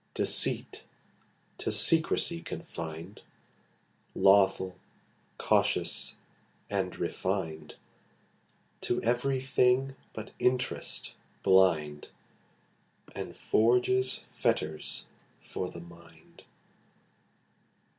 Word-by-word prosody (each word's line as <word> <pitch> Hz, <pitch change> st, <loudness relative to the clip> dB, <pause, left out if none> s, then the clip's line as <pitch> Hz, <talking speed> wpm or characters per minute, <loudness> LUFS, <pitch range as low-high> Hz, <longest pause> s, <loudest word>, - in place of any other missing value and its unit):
Deceit -, -, +2 dB, 0.8 s
to -, -, -2 dB
secrecy 165 Hz, +1 st, +3 dB
confinŌĆÖd, 85 Hz, -, -7 dB, 1.0 s
Lawful, 95 Hz, -1 st, +4 dB, 0.6 s
cautious -, -, +1 dB, 0.3 s
& -, -, -38 dB
refinŌĆÖd, 80 Hz, -5 st, -3 dB, 1.1 s
To 120 Hz, -, 0 dB
every 125 Hz, +3 st, +1 dB
thing 130 Hz, 0 st, +2 dB, 0.2 s
but 110 Hz, -1 st, -8 dB
interest 125 Hz, 0 st, -1 dB, 0.3 s
blind, 85 Hz, -6 st, +3 dB, 1.1 s
And -, -, -6 dB
forges 125 Hz, +3 st, +2 dB
fetters 75 Hz, 0 st, -2 dB, 0.3 s
for 90 Hz, -, -5 dB
the 85 Hz, -, -10 dB
mind. 85 Hz, -1 st, -17 dB
95 Hz, 65 wpm, -30 LUFS, 85-125 Hz, 1.1 s, Lawful